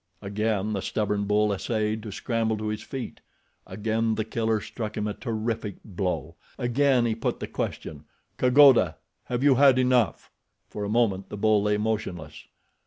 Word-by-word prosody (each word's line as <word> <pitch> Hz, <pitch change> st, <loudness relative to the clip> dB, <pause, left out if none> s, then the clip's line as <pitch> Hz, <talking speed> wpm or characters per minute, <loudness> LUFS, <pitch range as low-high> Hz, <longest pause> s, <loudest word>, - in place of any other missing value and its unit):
Again 105 Hz, +1 st, -1 dB
the 100 Hz, -, -2 dB
stubborn 105 Hz, 0 st, -1 dB
bull 105 Hz, 0 st, +2 dB
essayed 110 Hz, +1 st, -1 dB
to 105 Hz, -1 st, -7 dB
scramble 115 Hz, 0 st, -1 dB
to 105 Hz, 0 st, -3 dB
his 105 Hz, -, -3 dB
feet. 135 Hz, -3 st, -7 dB, 0.5 s
Again 110 Hz, +3 st, -1 dB
The 110 Hz, -, -2 dB
Killer 110 Hz, 0 st, 0 dB
struck 110 Hz, 0 st, -6 dB
him 105 Hz, -, -1 dB
a 105 Hz, -, -2 dB
terrific 115 Hz, -3 st, -3 dB
blow. 90 Hz, -4 st, -3 dB, 0.2 s
Again 125 Hz, 0 st, +2 dB
he 115 Hz, -, +1 dB
put 115 Hz, -, -3 dB
the -, -, -3 dB
question, 75 Hz, -1 st, -5 dB, 0.3 s
kagoda—have 125 Hz, -, +3 dB
you 145 Hz, -1 st, +6 dB
had 135 Hz, 0 st, +5 dB
enough? 125 Hz, -3 st, +1 dB, 0.4 s
For 105 Hz, -, -5 dB
a 100 Hz, -, -3 dB
moment 105 Hz, -4 st, +1 dB
the 105 Hz, -, -6 dB
bull 105 Hz, 0 st, +3 dB
lay 105 Hz, 0 st, +1 dB
motionless. 105 Hz, -8 st, -4 dB
110 Hz, 160 wpm, -26 LUFS, 105-115 Hz, 0.5 s, you